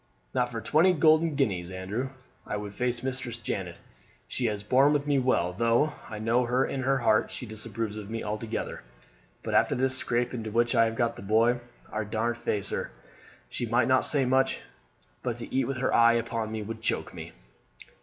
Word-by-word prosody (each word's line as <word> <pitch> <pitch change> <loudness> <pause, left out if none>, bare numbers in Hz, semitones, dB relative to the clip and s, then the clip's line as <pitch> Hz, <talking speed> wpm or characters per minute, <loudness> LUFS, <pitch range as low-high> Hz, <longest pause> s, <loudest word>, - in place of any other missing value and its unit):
"Not 125 -1 +1
for 115 -1 -4
twenty 170 +9 +4
golden 155 -1 +4
guineas, 95 -11 0
Andrew, 95 +8 -3 0.4
would 105 -1 -4
I - - -19
face 125 -1 -1
Mistress 125 -3 -3
Janet. 95 -6 -4 0.5
She 125 - -1
has 105 -2 -3
borne 135 +7 +4
with 145 -1 0
me 145 -2 +2
well, 125 -9 +1
though 115 +9 +2 0.2
I 110 - -6
know 115 +3 +2 0.2
in 135 - -2
her 135 +1 +2
heart 110 -4 +2
she - - -7
disapproves 110 -1 -5
of 105 -1 -7
me 115 0 -4
altogether; 105 +1 -4 0.6
but - - -3
after - - +3
this 130 +1 +1
scrape 120 -1 -1
into 110 -3 -4
which 120 +2 +2
I 115 - +5
have 115 0 -2
got 120 -1 0
the - - -8
boy 115 +4 +3 0.3
I 110 0 -1
daren't 115 +3 -1
face 105 -4 -1
her. - - -3 0.6
She 120 - -4
might 120 +1 +2
not 130 0 +4
say 140 -3 +4
much, 130 +1 +2 0.6
but 120 -2 -2
to 120 - -7
eat 130 -2 +2
with 135 -1 -2
her 130 - 0
eye 115 0 +6
upon 115 -1 -2
me 110 -1 -3
would 110 +1 -6
choke - - -1
me." - - -8
115 Hz, 195 wpm, -28 LUFS, 110-130 Hz, 0.6 s, eye